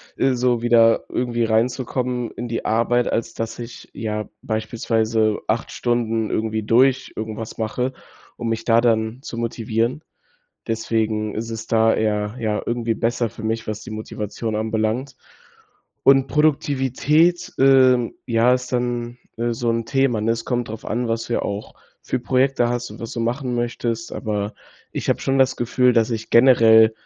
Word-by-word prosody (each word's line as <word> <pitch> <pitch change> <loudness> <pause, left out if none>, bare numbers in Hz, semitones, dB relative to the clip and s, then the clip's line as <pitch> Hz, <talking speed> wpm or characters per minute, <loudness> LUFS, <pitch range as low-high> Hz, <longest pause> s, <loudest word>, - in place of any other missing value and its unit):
äh, 135 -1 +2
so 125 -1 +1
wieder 115 -1 +4
irgendwie 120 -1 -1
reinzukommen 125 +2 0
in 120 - -6
die 115 0 -3
Arbeit, 120 +2 +1
als 115 0 -2
dass 115 +1 -5
ich, 120 0 -9
ja, 105 -1 -4
beispielsweise 110 -1 0
8 115 +1 -1
Stunden 115 -2 0
irgendwie 110 0 -1
durch 130 +5 +3
irgendwas 110 0 -5
mache, 125 +4 -1 0.5
um 120 - -4
mich 115 0 -2
da 115 0 +4
dann 115 +1 +1
zu 115 - -7
motivieren. 115 +3 -1 0.7
Deswegen 110 -2 -1
ist 115 +1 -4
es 115 0 -6
da 115 0 +4
eher, 105 -1 -1
ja, 105 -2 0
irgendwie 120 -1 -1
besser 115 0 -1
für 110 - -10
mich, 110 0 -2
was 110 0 -4
die - - -9
Motivation 110 0 -4
anbelangt. 110 +5 -1 0.9
Und 135 -1 +5
Produktivität, 150 +3 +2
ähm, 130 -3 +5
ja, 115 +1 +3
ist 125 0 -4
dann, 120 0 -2 0.2
äh, 120 +1 -1
so 115 0 -1
'n 115 0 -1
Thema, 135 -4 +1
ne? 110 +2 +1
Es 115 0 -4
kommt 120 -2 -2
drauf 110 0 -8
an, 120 +2 -2
was 115 0 -2
du 120 - 0
auch 100 +1 -5 0.3
für 130 - 0
Projekte 130 0 +1
hast 120 0 -3
und - - -11
was 115 - -6
du 115 - -3
machen 125 +2 -1
möchtest. 120 -1 -2
Aber 105 -1 -3 0.4
ich - - -4
habe - - +1
schon 135 0 +1
das 130 0 +3
Gefühl, 125 +1 +2
dass 115 0 +3
ich 115 -1 -4
generell, 115 -3 +6
115 Hz, 165 wpm, -21 LUFS, 110-125 Hz, 0.9 s, generell